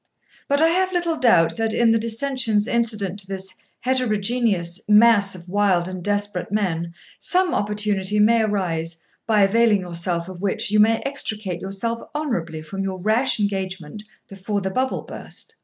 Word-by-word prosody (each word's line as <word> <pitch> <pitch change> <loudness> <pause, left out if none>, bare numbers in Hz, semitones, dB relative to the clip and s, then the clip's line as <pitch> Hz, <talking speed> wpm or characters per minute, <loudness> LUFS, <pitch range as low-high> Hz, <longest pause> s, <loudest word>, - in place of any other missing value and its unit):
But 285 +2 +2
I 325 - +5
have 370 +2 +1
little 345 -2 0
doubt 165 - +3
that, 225 -1 0
in 235 -1 +4
the 225 - +3
dissensions 230 -2 +1
incident 215 -5 -1
to 190 - -9
this 190 -1 -4 0.3
heterogeneous 220 -7 0
mass 210 -2 +5
of 175 -1 -12
wild 185 -2 +1
and 185 -1 -6
desperate 205 -2 -2
men, 170 -5 -2 0.2
some 365 -1 +1
opportunity 210 -1 0
may 225 +2 +4
arise, 170 -6 -2 0.3
by 215 -3 +4
availing 215 0 +3
yourself 170 -1 -3
of 185 -1 -9
which 200 0 -1
you 210 - +3
may 225 +2 +4
extricate 215 -10 -3
yourself 200 +5 -3
honourably 170 - -3
from 195 +5 -6
your 190 -1 -4
rash 220 +6 +2
engagement 190 -3 -3 0.3
before 200 +1 -3
the 190 -1 -3
bubble 260 +5 -1
burst. - - -8
205 Hz, 155 wpm, -22 LUFS, 185-230 Hz, 0.3 s, I